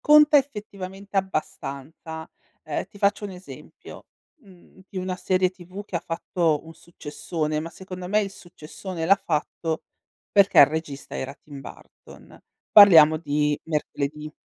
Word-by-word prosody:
conta 300 0 +7
effettivamente 200 -6 -6
abbastanza. 160 -3 -4 0.3
Ehm, 155 +2 -4
ti 200 - -16
faccio 200 +1 +1
un 200 - -5
esempio, 180 +1 -12 0.4
mhmm, 190 -1 -19
di 195 - -12
una 185 0 -3
serie 185 0 +1
TV 185 +2 -10
che 185 - -4
ha - - -2
fatto 165 -2 -1
un 165 - -11
successone, 155 -1 -4
ma 165 - -5
secondo 185 -1 -8
me 210 +2 +3
il 200 - -3
successone 175 -1 -8
l'ha 190 +4 +6
fatto 160 -1 -2 0.5
perché 200 -1 +4
il 140 - +10
regista 150 -2 -5
era 135 +1 -5
Tim 145 -1 -12
Burton: - - -14 0.3
Parliamo 165 -7 +9
di 150 -2 0
Mercoledì. 150 -1 -3
175 Hz, 140 wpm, -24 LUFS, 155-195 Hz, 0.5 s, il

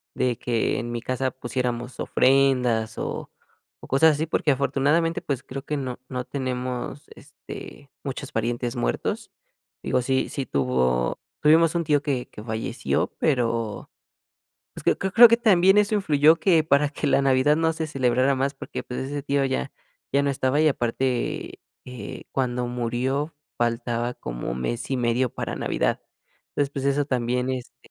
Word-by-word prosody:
de 125 -3 0
que 115 -2 0
en 120 - -4
mi 120 -1 -3
casa 130 +1 -1
pusiéramos 125 0 -3
ofrendas 125 -4 +2
o - - -4 0.5
o - - -12
cosas 155 +4 +5
así 155 +2 -2
porque 155 -2 +1
afortunadamente 140 +5 +1
pues 135 -3 -2
creo 135 +1 -7
que 150 - -2
no 130 -2 -4
no 125 -1 -3
tenemos, 130 0 -4
este, 140 - -11
muchos 140 0 -5
parientes 120 +1 -2
muertos. - - -2 0.5
Digo, 125 - +1
sí 130 +1 0
sí 135 - -3
tuvo 65 -2 0 0.2
tuvimos 160 +2 +5
un 170 - +1
tío 145 -2 +3
que 130 -4 -1
que 105 - -10
falleció, 115 +2 -1
pero, 115 -6 0 0.9
pues, - - -9
creo - - +3
creo 190 -1 -2
creo 235 +2 +10
que 230 - +5
también 195 -3 +5
eso 210 +1 +3
influyó 160 -5 +4
que 165 -3 +3
para 145 -1 +3
que 150 - -3
la 140 - +3
Navidad 135 +2 +3
no 160 0 +2
se 160 0 -3
celebrara 130 -1 +2
más 135 +2 0
porque, - - -6
pues, 125 - -5
ese 145 0 -4
tío 140 0 +1
ya 130 - -2 0.4
ya 140 - +3
no 140 - +1
estaba 135 +2 +1
y 155 - +4
aparte, 125 -1 -1 0.2
eh, 125 -2 -8
cuando 125 -2 -1
murió 125 +5 -2 0.2
faltaba 120 0 -1
como - - -5
mes 115 - -3
y 135 - +1
medio 120 +1 +1
para - - -3
Navidad. - - 0 0.5
Entonces, 140 -1 -1
pues, 135 -1 -4
eso 140 +1 +2
también, 125 -1 0
este. 130 0 -7
130 Hz, 165 wpm, -24 LUFS, 120-145 Hz, 0.9 s, creo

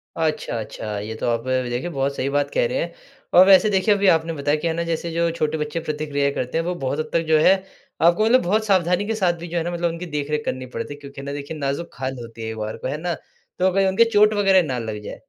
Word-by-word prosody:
अच्छा 155 -7 -1
अच्छा, 105 -1 -5
ये 110 +2 -5
तो 110 - -3
आप 115 +1 -1 0.2
देखिए 125 +8 -3
बहुत 140 -2 -1
सही 135 - -1
बात 145 0 0
कह - - +2
रहे - - -2
हैं। - - -2 0.4
और 185 +1 +8
वैसे 195 +2 +7
देखिए, 200 +1 +3
अभी 200 -1 +1
आपने 165 +1 -2
बताया 145 0 0
कि 170 - 0
है 165 - 0
ना 170 - -1
जैसे 165 +1 -2
जो 170 0 +1
छोटे 155 0 0
बच्चे 150 +2 -3
प्रतिक्रिया 145 -2 -1
करते 125 +3 -3
हैं। 165 - +1
वो 180 0 -2
बहुत 135 +3 -1
हद 155 - -3
तक 165 - +3
जो 155 -1 +4
है, 190 +5 +6 0.5
आपको 175 +6 +4
मतलब 255 +3 +5
बहुत 215 +5 +1
सावधानी 185 0 +2
के 225 - -1
साथ 185 -5 +2
भी 170 - -7
जो 170 +1 -3
है 165 - 0
ना 175 - -3
मतलब 170 0 0
उनकी 170 +2 -6
देख-रेख 150 -1 -3
करनी 130 0 -3
पड़ती 145 - -4
है। 145 - -12
क्योंकि 140 -1 -10
ना 140 0 -5
देखिए 145 +2 -6
नाज़ुक 140 +4 -3
खाल 130 0 -4
होती 115 -1 -10
है, 110 - -4
एक 110 - -7
बार 110 0 -4
को - - -5
है 145 +3 -2
ना, 175 -1 -1 0.5
तो 185 - +2
अगर 190 +1 +2
उनके 230 +5 +4
चोट 210 +1 +5
वग़ैरह 195 -2 +4
ना 125 -2 -2
लग 105 -1 -5
जाए। - - -8
160 Hz, 275 wpm, -22 LUFS, 140-180 Hz, 0.5 s, और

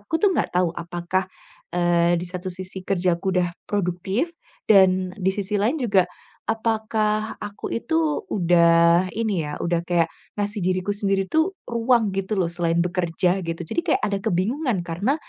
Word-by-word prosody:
aku 205 +10 -7
tuh 400 0 +3
gak - - +1
tahu 180 -2 +2
apakah, 175 +2 -2 0.4
eee, 175 0 +2
di 175 - -4
satu 180 +1 -5
sisi 185 +1 -6
kerjaku 180 -1 0
udah 175 -1 0 0.2
produktif 195 - -1 0.3
dan 185 -3 +5
di 190 -2 0
sisi 200 +1 -3
lain 250 +10 +1
juga 200 -7 +3 0.5
apakah 220 -1 -1
aku 205 0 -6
itu 320 +4 0
udah 170 -1 +4
ini 210 -8 -1
ya, 150 - -4
udah 170 0 +1
kayak 170 -2 +2 0.2
ngasih 205 0 -2
diriku 185 +2 0
sendiri 195 -1 0
tuh 320 +5 +2 0.2
ruang 235 -2 +2
gitu 195 +2 -1
loh 180 -4 0
selain 170 0 +1
bekerja 180 +1 0
gitu. 165 +1 -3
Jadi 170 - -2
kayak - - -1
ada 200 -1 0
kebingungan 205 - 0
karena 175 +11 -1
190 Hz, 155 wpm, -23 LUFS, 175-215 Hz, 0.5 s, dan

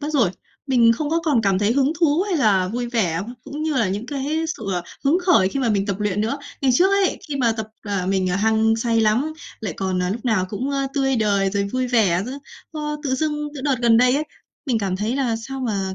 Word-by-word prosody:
mất 295 - -3
rồi, 235 -11 +3 0.4
mình 240 -3 +5
không 290 +5 -3
có 330 +1 +1
còn 280 -8 +2
cảm 195 -2 +2
thấy 205 +3 +2
hứng 275 +3 +2
thú 325 +1 +3
hay 370 - +1
là 200 -9 +3
vui 240 +4 -3
vẻ, 185 -9 0 0.2
cũng 295 +2 -6
như 315 -1 -1
là 230 -7 +2
những 205 +5 -3
cái 290 +4 -2
sự, - - -11
à, 175 - -1 0.2
hứng 295 +6 +4
khởi 270 - +5
khi 275 - -3
mà 250 - +1
mình 200 -2 +1
tập 200 -1 -3
luyện 210 -1 0
nữa. 230 +6 -1 0.2
Ngày 270 - +2
trước 370 +9 +4
ấy, 395 -1 +2
khi 290 - -3
mà 240 -4 +2
tập, 220 -1 -5 0.2
à, 200 -4 -2
mình, 190 -1 +1
à, 180 - 0
hăng 220 +2 +2
say 230 0 +1
lắm, 225 +8 +2 0.3
lại 205 -6 -3
còn, 185 -2 -1
à, 180 - -1
lúc 225 +5 -4
nào 220 -7 +2
cũng, 240 +8 -3
ơ, 275 -1 -1
tươi 270 -2 +1
đời 200 -3 +1
rồi 200 0 0
vui 255 0 0
vẻ 205 -8 +2
nữa, 265 +3 -6 0.3
ờ, 300 -1 -3
tự 270 -3 0
dưng 295 +1 -2
từ 280 - -6
đợt 275 -1 +1
gần 230 -1 +5
đây 250 +2 +4
ấy, 295 +2 0 0.4
mình 245 -4 +1
cảm 195 -3 -2
thấy 215 +6 -1
là 245 -5 0
sao 265 +4 -6
mà 200 -6 -2
235 Hz, 255 wpm, -22 LUFS, 205-275 Hz, 0.4 s, mình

